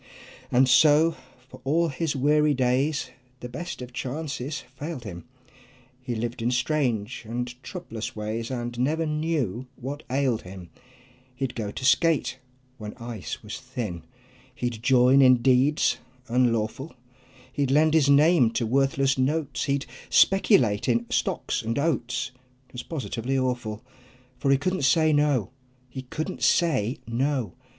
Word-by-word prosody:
And 130 +2 +4
so 155 +5 +5 0.3
for - - -14
all 165 +5 +2
his 145 +2 -2
weary 150 +2 +3
days 130 +4 0 0.3
The 125 - -5
best 170 +2 -6
of 125 0 -10
chances 140 +1 -4
failed 140 +1 -7
him; 90 -4 -8 0.8
He 125 -1 -4
lived 115 +1 -4
in 115 - +1
strange 125 -4 -1
and 125 +1 -3
troublous 125 - -7
ways 110 +2 -4
And 120 -2 -4
never 155 +6 +1
knew 150 - -2
what 140 +4 -6
ailed 130 -3 +1
him; 90 -1 -11 0.6
He'd 130 -1 -3
go 110 -3 -4
to 130 - -6
skate 145 -1 +2 0.4
when 105 -1 -7
ice 115 -4 -7
was 105 +5 -7
thin; 120 -10 -5 0.5
He'd 120 -3 -3
join 130 +2 +5
in 130 -2 +5
deeds 135 +3 +3 0.3
unlawful, 120 +3 0 0.6
He'd 140 -2 0
lend 155 +3 +4
his 150 -3 +4
name 145 -2 +5
to 115 - 0
worthless 135 +2 +1
notes, 145 +1 0
He'd 140 -1 -1 0.2
speculate 130 - +4
in 120 0 +2
stocks - - -1
and 115 +1 -3
oats; 135 -3 -1 0.4
'Twas 125 - -7
positively 135 -4 -3
awful, 125 -4 -2 0.6
For 140 - 0
he 135 - +5
couldn't 185 +6 -1
say 155 +4 +4
"No!" 145 -7 +2 0.4
He 130 +1 -6
couldn't 155 +8 -5
say 135 - +2
"No!" 130 0 -1
130 Hz, 140 wpm, -25 LUFS, 120-150 Hz, 0.8 s, so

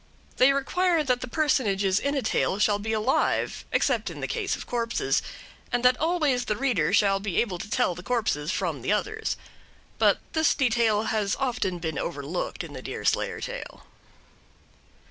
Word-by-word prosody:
They 255 +2 +6
require 330 +4 +1
that 250 -3 0
the 255 - -4
personages 205 -10 +1
in 280 +1 -1
a 275 - 0
tale 200 - +1
shall 205 0 +2
be 220 +2 -3
alive, 220 +4 0
except - - +1
in - - -8
the - - -3
case - - -1
of - - -8
corpses, 235 -1 0 0.5
and 245 0 0
that 250 0 +6
always 305 -6 +1
the 210 - 0
reader 220 - +1
shall 200 -1 +3
be 195 -3 -1
able 190 -7 -1
to 210 - -7
tell 245 -4 +1
the 180 - -9
corpses 185 -9 -1
from 165 -8 -2
the 130 - -1
others. 435 - -1 0.6
But - - +5 0.2
this 320 -1 +3
detail 230 -4 +2
has 210 -2 0
often 240 -9 -1
been 160 -4 -3
overlooked 155 +1 -3
in - - -9
the - - -7
Deerslayer - - -1
tale. - - -7
225 Hz, 170 wpm, -26 LUFS, 195-270 Hz, 0.6 s, They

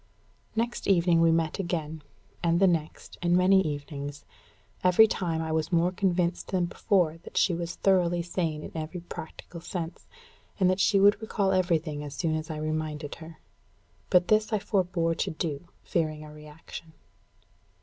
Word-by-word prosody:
Next 235 +2 -2
evening 170 -3 +4
we 165 0 +5
met 165 +1 0
again, 160 -4 -3 0.4
and 170 0 +2
the 195 - +5
next, 165 -4 -2
and 175 0 +3
many 190 +1 +5
evenings. 145 -2 -5 0.6
Every 180 +4 +7
time 165 -6 -1
I 160 - -3
was 160 +1 -1
more 170 +1 +3
convinced 180 -2 0
than 185 -2 0
before 170 -2 +1
that - - -10
she 185 - +4
was 170 0 -4
thoroughly 175 -3 +2
sane 165 -3 -2
in - - -8
every 160 +2 -5
practical 170 0 -9
sense, 170 -1 -6 0.5
and 185 -1 +4
that 185 - -1
she 200 0 +4
would 205 +2 +5
recall 205 -3 0
everything 165 -5 0
as 145 -1 -7
soon 160 +2 0
as 155 +1 -3
I 155 - -4
reminded 155 -1 -3
her. 160 0 -10 0.7
But 180 -1 +4
this 215 +1 +3
I 215 - +2
forbore 180 -5 0
to - - 0
do, 160 0 -4 0.2
fearing 155 -2 -1
a 150 - -11
reaction. 150 +1 -11
170 Hz, 165 wpm, -28 LUFS, 155-185 Hz, 0.7 s, Every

